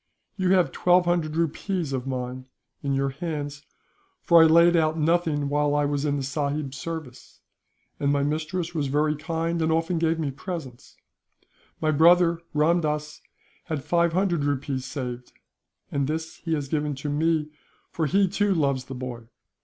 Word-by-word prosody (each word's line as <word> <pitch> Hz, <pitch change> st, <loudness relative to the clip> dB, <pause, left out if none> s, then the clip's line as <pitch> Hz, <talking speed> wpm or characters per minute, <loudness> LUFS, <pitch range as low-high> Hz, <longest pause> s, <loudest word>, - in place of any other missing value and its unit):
You 185 Hz, -2 st, +2 dB
have 180 Hz, -2 st, +3 dB
twelve 180 Hz, 0 st, +3 dB
hundred 170 Hz, -3 st, 0 dB
rupees 165 Hz, -1 st, -1 dB
of 130 Hz, 0 st, -3 dB
mine, 130 Hz, 0 st, -4 dB, 0.3 s
in 140 Hz, -1 st, -1 dB
your 135 Hz, 0 st, +1 dB
hands; 145 Hz, -1 st, -5 dB, 0.6 s
for 170 Hz, -1 st, +6 dB
I 160 Hz, -, +8 dB
laid 170 Hz, +2 st, +6 dB
out 160 Hz, -1 st, +2 dB
nothing 160 Hz, -2 st, +1 dB
while 145 Hz, 0 st, +1 dB
I 145 Hz, 0 st, +2 dB
was 145 Hz, 0 st, -1 dB
in 145 Hz, -1 st, 0 dB
the 140 Hz, -, -3 dB
sahib's 140 Hz, 0 st, -2 dB
service, 150 Hz, -5 st, -8 dB, 0.6 s
and 140 Hz, 0 st, +1 dB
my 140 Hz, -1 st, +1 dB
mistress 160 Hz, +4 st, -2 dB
was 150 Hz, -4 st, -1 dB
very 150 Hz, +2 st, +1 dB
kind, 165 Hz, +2 st, -2 dB
and 160 Hz, 0 st, +1 dB
often 165 Hz, +1 st, 0 dB
gave 165 Hz, 0 st, +1 dB
me 155 Hz, -4 st, -2 dB
presents. 140 Hz, -5 st, -8 dB, 0.8 s
My 155 Hz, -1 st, +1 dB
brother, 170 Hz, +2 st, +5 dB
Ramdass, 150 Hz, -1 st, 0 dB, 0.4 s
had 155 Hz, -5 st, -3 dB
five 170 Hz, +2 st, +2 dB
hundred 175 Hz, -4 st, +1 dB
rupees 140 Hz, -2 st, -2 dB
saved; 125 Hz, -2 st, -6 dB, 0.6 s
and 140 Hz, -1 st, 0 dB
this 160 Hz, +1 st, -4 dB
he 165 Hz, -2 st, -2 dB
has 145 Hz, -2 st, -3 dB
given 150 Hz, 0 st, -1 dB
to 140 Hz, +3 st, -6 dB
me, 155 Hz, +1 st, 0 dB, 0.4 s
for 160 Hz, -2 st, -1 dB
he, 195 Hz, +6 st, +3 dB
too, 200 Hz, +1 st, +1 dB
loves 140 Hz, -5 st, 0 dB
the 135 Hz, -, -7 dB
boy. 125 Hz, -2 st, -7 dB
155 Hz, 165 wpm, -25 LUFS, 140-165 Hz, 0.8 s, I